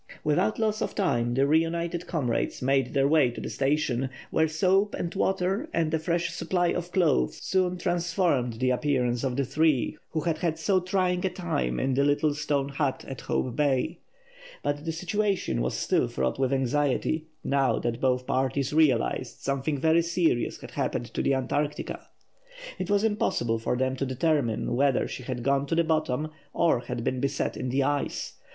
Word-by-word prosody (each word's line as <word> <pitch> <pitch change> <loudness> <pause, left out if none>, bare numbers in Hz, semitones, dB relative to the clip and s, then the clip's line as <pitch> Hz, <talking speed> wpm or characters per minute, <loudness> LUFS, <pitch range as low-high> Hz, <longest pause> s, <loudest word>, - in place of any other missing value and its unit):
Without 150 +8 +1
loss 215 -1 0
of - - -2
time 120 - +1
the 135 +1 +3
reunited 165 +3 0
comrades 125 -9 -1
made 135 +1 +1
their 135 0 +4
way 150 -4 +4
to 120 - -7
the - - -5
station, 135 -2 0 0.2
where 160 - +3
soap 190 +5 +2
and 170 - -3
water 190 - 0
and 160 -2 +1
a 160 - +2
fresh 170 +1 -1
supply 175 -2 0
of 175 0 -3
clothes 150 - +2
soon 185 -1 +1
transformed 170 -8 0
the 130 +3 0
appearance 125 -2 0
of 130 -2 -1
the 140 0 0
three 150 0 +1
who 160 - -2
had 160 -1 -1
had 165 -2 0
so 185 +4 +2
trying 180 -1 0
a 190 - +2
time 175 -5 -2
in 130 0 0
the 140 +2 +2
little 145 +1 +2
stone 145 -2 -1
hut 140 -1 -2
at 135 -3 -7
Hope 125 -2 -2
Bay. 150 +3 +1 0.6
But 145 +1 -2
the 165 - -1
situation 185 - -1
was 60 - -1
still - - +1
fraught 65 - -2
with 130 -1 +1
anxiety, 145 +4 0 0.2
now 135 -1 +2
that 120 0 -2
both 125 -1 +1
parties 135 +2 0
realised 130 -5 +1
something 140 +2 -1
very 160 +4 +3
serious 170 -7 0
had - - -9
happened - - -3
to - - -1
the 135 - +2
Antarctica. 145 +3 -2 0.7
It 185 - -3
was 205 0 +3
impossible 120 - 0
for 120 +2 -1
them 130 +1 0
to 135 - -1
determine 130 -4 0
whether 135 0 +2
she - - -6
had 125 -1 -4
gone 140 +1 +1
to 165 - 0
the 170 - +3
bottom, 155 -2 0 0.2
or 170 -7 +3
had 125 -1 -5
been 130 +1 -1
beset 140 +1 -1
in 130 - -3
the 135 +2 +1
ice. 145 +1 -2
145 Hz, 185 wpm, -27 LUFS, 130-170 Hz, 0.7 s, their